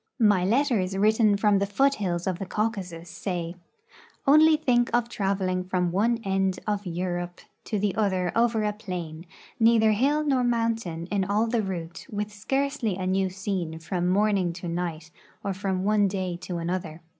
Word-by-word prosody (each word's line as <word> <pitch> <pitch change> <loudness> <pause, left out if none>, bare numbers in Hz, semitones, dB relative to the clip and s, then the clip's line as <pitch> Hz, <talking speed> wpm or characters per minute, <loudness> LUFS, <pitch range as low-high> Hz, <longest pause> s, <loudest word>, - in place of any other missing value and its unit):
My 205 -5 +4
letters 210 -4 +1
written 215 0 +4
from 205 -1 +3
the 200 - 0
foothills 205 -7 +1
of 185 -2 -2
the 195 - -3
Caucasus 190 -6 -3
say: 175 -1 -4 0.4
" - - -25
Onl}'' 310 +2 +6
think 240 -5 +2
of 240 -1 +1
traveling 195 -3 -1
from 180 -1 0
one 225 +6 +2
end 190 -1 0
of 205 -2 -2
Europe 175 0 -3 0.3
to 215 - -2
the 205 -1 0
other 190 -4 0
over 230 -1 +2
a 210 0 0
plain, 175 -5 -6 0.3
neither 225 -1 +5
hill 280 +8 +2
nor 270 -4 +2
mountain 230 -8 -1
in 200 -2 +1
all 205 +4 +1
the 230 0 0
route, 175 -4 -5
with 210 0 -4
scarcely 270 0 -1
a 185 0 -4
new 190 0 +1
scene 185 -4 -3
from 175 +2 -2
morning 195 -2 +2
to 175 +1 -7
night 170 -1 -4 0.3
or 200 - -1
from 190 -1 -2
one 205 0 +3
day 185 -2 -2
to 175 0 -5
another. 170 -1 -4
195 Hz, 170 wpm, -26 LUFS, 180-220 Hz, 0.4 s, Onl